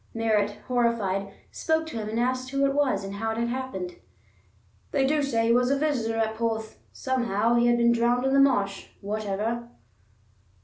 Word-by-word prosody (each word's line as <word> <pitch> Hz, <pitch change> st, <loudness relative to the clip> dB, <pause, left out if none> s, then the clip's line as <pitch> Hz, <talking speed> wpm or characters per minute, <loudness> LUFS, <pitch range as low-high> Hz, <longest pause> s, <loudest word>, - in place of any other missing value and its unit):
Merritt, 210 Hz, -2 st, +1 dB
horrified, 225 Hz, -6 st, 0 dB, 0.2 s
spoke 320 Hz, 0 st, 0 dB
to 315 Hz, -7 st, -6 dB
him 215 Hz, -1 st, -4 dB
and 225 Hz, +2 st, -2 dB
asked 255 Hz, +1 st, -1 dB
who 275 Hz, +1 st, +1 dB
it 275 Hz, -, +1 dB
was, 275 Hz, -9 st, +1 dB
and 195 Hz, 0 st, -6 dB
how 225 Hz, +2 st, -3 dB
it -, -, -6 dB
had 235 Hz, +1 st, 0 dB
happened. 240 Hz, -9 st, -4 dB, 0.9 s
"They 275 Hz, -2 st, +1 dB
do 295 Hz, +2 st, +2 dB
say 235 Hz, -5 st, 0 dB
he 230 Hz, -, +4 dB
was 250 Hz, +1 st, +3 dB
a 280 Hz, -, +2 dB
visitor 255 Hz, -7 st, 0 dB
at 220 Hz, -1 st, 0 dB
Porth. 220 Hz, -1 st, -3 dB
Somehow 235 Hz, -4 st, 0 dB
he 240 Hz, 0 st, +3 dB
has 240 Hz, 0 st, +4 dB
been 235 Hz, 0 st, +4 dB
drowned 240 Hz, +2 st, +2 dB
in 265 Hz, -, +1 dB
the 275 Hz, -, +5 dB
marsh, 205 Hz, -8 st, +2 dB
whatever." 215 Hz, +3 st, -3 dB
235 Hz, 185 wpm, -26 LUFS, 215-260 Hz, 0.9 s, the